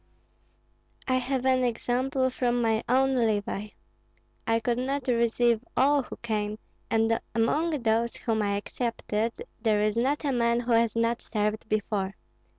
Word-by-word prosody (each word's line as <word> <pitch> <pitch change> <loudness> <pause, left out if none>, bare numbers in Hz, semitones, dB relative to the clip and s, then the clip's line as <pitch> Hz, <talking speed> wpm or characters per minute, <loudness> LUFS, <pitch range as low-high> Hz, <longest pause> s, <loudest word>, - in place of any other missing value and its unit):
I 255 -1 +2
have 255 0 -1
an 260 -1 +3
example 255 +2 0
from 245 -1 0
my 225 -2 +1
own 265 +2 +3
levy. 210 -3 -1 0.7
I 225 0 +3
could 235 +1 -1
not 270 +1 -2
receive 235 -1 +2
all 280 +2 +4
who - - -9
came, 215 -2 -2 0.3
and 225 0 +2 0.2
among 295 +5 +1
those 230 +1 +1
whom 220 -2 -1
I 200 -1 0
accepted 230 0 -2 0.3
there 215 -2 +2
is 215 0 +1
not 275 +6 +1
a 280 - +1
man 235 -1 +2
who 245 0 -3
has 230 -1 +3
not 230 +1 +1
served 215 0 -2
before. 200 -2 -1
235 Hz, 150 wpm, -27 LUFS, 220-255 Hz, 0.7 s, all